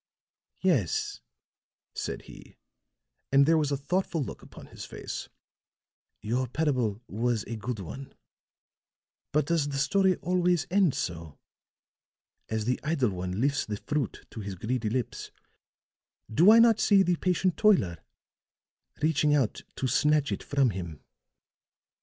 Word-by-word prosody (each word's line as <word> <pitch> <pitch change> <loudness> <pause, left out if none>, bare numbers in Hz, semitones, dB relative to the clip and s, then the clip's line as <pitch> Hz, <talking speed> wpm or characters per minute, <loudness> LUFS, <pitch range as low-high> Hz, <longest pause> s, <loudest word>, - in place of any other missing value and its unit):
"Yes," 135 - 0 0.7
said - - -4
he, - - -14 0.7
and 140 +1 +6
there 165 +2 +4
was 150 -2 0
a 140 - +1
thoughtful 170 +2 -1
look - - -8
upon - - -13
his - - -10
face, - - -7 0.9
"your 125 +4 -1
parable 125 -6 -1
was 115 +1 -1
a 115 - -6
good 115 +2 -4
one. 120 +9 -8 1.2
But 150 -1 +2
does 160 -2 0
the 140 - -3
story 190 +7 +3
always 180 -1 +1
end 190 -6 +3
so? 80 -4 -5 1.1
As 110 -1 -2
the 125 +1 0
idle 145 -7 +1
one 90 +1 -4
lifts 140 +3 +1
the 105 -1 -3
fruit 145 +1 -3
to - - -8
his 100 -2 -5
greedy 110 +4 -2
lips, 125 +2 -3 1.0
do 170 - +6
I 225 - +8
not 230 -2 +6
see 200 -2 +5
the 180 -2 +1
patient 185 0 +1
toiler 120 - +3 1.0
reaching 150 -1 +3
out 130 -7 0
to - - -3
snatch 150 +3 +2
it - - -2
from 140 -4 +1
him?" 85 -6 -7
140 Hz, 135 wpm, -28 LUFS, 110-165 Hz, 1.2 s, I